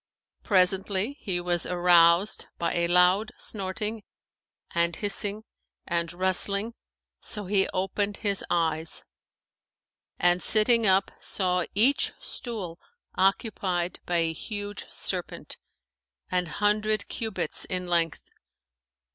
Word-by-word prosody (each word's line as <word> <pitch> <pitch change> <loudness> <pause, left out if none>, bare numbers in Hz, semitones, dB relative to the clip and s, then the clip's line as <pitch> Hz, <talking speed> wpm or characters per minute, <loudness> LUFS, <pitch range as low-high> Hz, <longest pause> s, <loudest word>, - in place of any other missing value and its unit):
Presently, 195 +5 +1
he 185 -4 -2
was 175 -1 0
aroused 175 +2 +4
by 170 -1 -1
a 170 0 +1
loud 180 +5 +3
snorting 210 +2 -3 0.7
and 170 0 0
hissing 205 +1 -1 0.4
and 170 -1 -1
rustling, 195 +4 +3 0.5
so 210 -2 +1
he 195 0 +2
opened 200 +2 -2
his 200 -3 +2
eyes; 160 -1 +1 1.1
and, 175 0 +2
sitting 225 +1 +3
up, 190 +1 +3
saw 180 -2 0
each 245 +8 +3
stool 195 -9 -6 0.3
occupied 190 -2 0
by 175 - +1
a 165 -1 +1
huge 205 +3 -7
serpent, - - -4 0.7
an 180 -1 0
hundred 210 +3 0
cubits 220 -3 -3
in 180 -1 -3
length. 170 -2 -1
190 Hz, 105 wpm, -26 LUFS, 175-210 Hz, 1.1 s, aroused